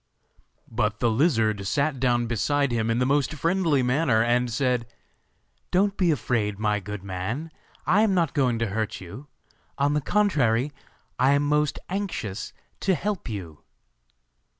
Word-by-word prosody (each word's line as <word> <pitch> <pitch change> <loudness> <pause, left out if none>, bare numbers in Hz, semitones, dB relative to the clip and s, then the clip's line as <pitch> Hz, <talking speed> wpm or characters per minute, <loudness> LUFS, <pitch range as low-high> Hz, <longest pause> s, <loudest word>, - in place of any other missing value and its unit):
But 110 -1 -1
the 120 -2 +2
lizard 110 - +1
sat 140 +4 0
down 120 -2 +2
beside 140 +4 0
him 115 -1 0
in 115 - +1
the 125 - +2
most 145 +3 +1
friendly 165 -3 +1
manner, 125 -3 +2
and 120 +1 +2
said: 125 -2 0 0.8
'Don't 200 +2 +2
be 185 -4 +2
afraid, 110 -8 0
my 105 0 0
good 105 0 -7
man, 105 - -4 0.3
I 200 +4 +4
am 210 -3 +3
not 165 -5 +1
going 125 -4 +2
to 115 0 0
hurt 110 0 -2
you; 100 +11 -10 0.5
on 145 +1 +2
the 150 - +1
contrary, 145 - +2 0.5
I 130 +2 +4
am 140 0 +2
most 150 0 +1
anxious 180 - -4 0.3
to 190 -1 +2
help 195 -1 -3
you. 90 -8 -6
125 Hz, 150 wpm, -25 LUFS, 110-150 Hz, 0.8 s, I